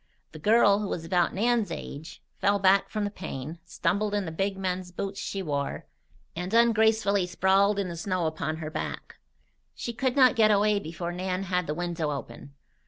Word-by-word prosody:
The 155 - -10
girl, 205 +2 +4
who 210 - -3
was 165 -3 -4
about 175 0 +2
Nan's 230 +1 +1
own - - -2
age, 155 +3 -9 0.2
fell 200 +1 +3
back 195 0 +3
from 215 -1 -2
the 205 - -2
pane, 155 -3 -7
stumbled 205 +2 -1
in 205 -2 -1
the 160 - -5
big, 195 +4 -2
men's 185 -1 -3
boots 195 +2 -4
she 195 -1 -4
wore, 140 -4 -3 0.5
and 180 +2 -4
ungracefully 220 -4 +3
sprawled 195 +3 +3
in 200 -2 -1
the 170 - -5
snow 180 0 -1
upon 155 0 -2
her 155 -1 -6
back. - - -5 0.6
She 235 - -5
could 255 +1 -1
not 255 -3 +6
get 220 -2 +5
away 210 0 +3
before 170 -1 -5
Nan 185 +1 -2
had 180 -2 -1
the 150 - -2
window 170 -2 -2
open. 140 0 -7
190 Hz, 190 wpm, -27 LUFS, 170-205 Hz, 0.6 s, not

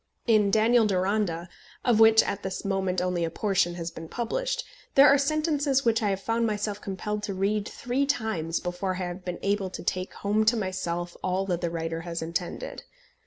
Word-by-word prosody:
In 215 -4 +4
Daniel 225 +2 +4
Deronda, 185 -3 0 0.4
of 235 -3 +4
which 220 0 +7
at 200 0 -3
this 190 +1 -5
moment 190 -2 0
only 180 -2 0
a 165 - 0
portion 175 -1 0
has 170 -1 -4
been 165 0 -9
published, - - -2 0.3
there 275 +1 +9
are 280 0 +6
sentences 290 -2 +1
which 230 0 +3
I 210 - +1
have 195 -1 -1
found 230 +2 0
myself 210 -1 -2
compelled 210 +1 -3
to 200 -2 -4
read 200 +2 0
three 255 +3 -1
times 200 - -1
before 180 +1 -3
I 185 0 -3
have 175 +1 -6
been 180 -1 -4
able 200 -1 0
to 185 - -7
take 185 +1 -2
home 210 +2 +1
to 230 +2 +4
myself 175 -3 -3
all 185 +1 0
that 175 -3 -1
the 170 - 0
writer 165 0 -3
has 170 -1 -4
intended. 170 - -4
195 Hz, 195 wpm, -27 LUFS, 180-225 Hz, 0.4 s, there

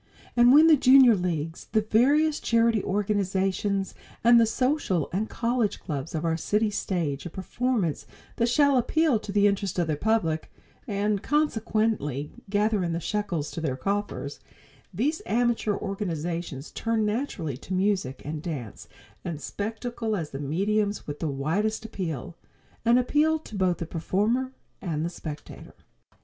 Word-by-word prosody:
And 240 0 +6
when 300 +4 +8
the 325 -1 +8
Junior 260 -2 +7
Leagues 165 -3 -3
the 220 - +4
various 285 +8 +3
charity 230 -2 +2
organizations 195 -1 0 0.3
and 235 0 +7
the 225 - +4
social 250 - 0
and 210 +4 -1
college 235 -2 0
clubs 150 -1 -5
of 160 +1 -2
our 165 -1 +1
cities 210 +4 0
stage 165 -5 -2
a - - -7
performance 195 - -2 0.3
that 235 0 +2
shall 285 +1 +4
appeal 295 0 +2
to 210 - -7
the 205 0 +3
interest 200 -2 0
of 175 - +2
their 155 -1 -1
public, 165 -4 0 0.4
and 205 -1 0
consequently 220 - 0 0.2
gather 210 -1 +1
in 170 -1 -1
the 165 - -1
shekels 175 -5 -2
to 165 - -5
their 135 -5 -2
coffers, 200 -4 -3 0.5
these 265 - -1
amateur 230 0 +1
organizations 170 -7 -4
turn 225 -1 0
naturally 210 - -2
to 165 - -13
music 185 -8 0
and 150 +1 -4
dance 140 - -6 0.4
and 165 -4 -4
spectacle 225 +5 -3
as 165 -6 -4
the 135 - -5
mediums 205 +8 0
with 145 0 -6
the 165 - -1
widest 190 +12 -1
appeal; 175 - -5 0.5
an 235 +1 +5
appeal 300 +5 +2
to 305 - -14
both 185 -3 +1
the 170 - -4
performer 210 +11 0 0.3
and 160 -4 -2
the 170 - -3
spectator. 155 -3 -9
205 Hz, 150 wpm, -26 LUFS, 165-230 Hz, 0.5 s, when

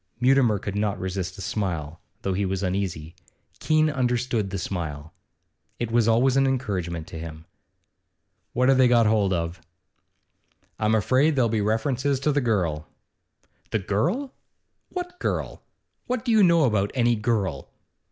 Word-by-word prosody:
Mutimer 125 -4 +4
could 100 +1 -5
not 105 -1 -1
resist 95 0 -4
a - - -8
smile, 85 -6 -3 0.2
though 95 - 0
he 100 +2 0
was 95 0 -2
uneasy. 90 -4 -2 0.5
Keene 155 0 +3
understood 125 -6 0
the 95 - -4
smile; 80 -5 -5 0.6
it 120 -2 -3
was 115 -1 +3
always 125 +3 +3
an 135 0 +4
encouragement 95 -11 -2
to 85 -2 -8
him. 80 -1 -8 1.1
'What 125 +1 +2
have 135 -1 +4
they 130 - +6
got 120 -2 +4
hold 105 -3 +2
of?' 85 0 -2 1.2
'I'm 110 0 +2
afraid 130 +8 +3
there'll 125 -4 +2
be 110 -1 0
references 130 +6 0
to 150 - +2
the 145 0 +1
girl.' 90 - 0 0.8
'The - - 0
girl?' 105 - 0
Richard 270 - -15
hesitated. - - -36
'What 355 0 -5
girl? - - -3 0.4
What 250 -1 -2
do 240 - +1
you 220 -1 +5
know 170 -4 +5
about 105 -6 +2
any 120 -2 +3
girl? 105 - -1
110 Hz, 160 wpm, -25 LUFS, 95-130 Hz, 1.2 s, they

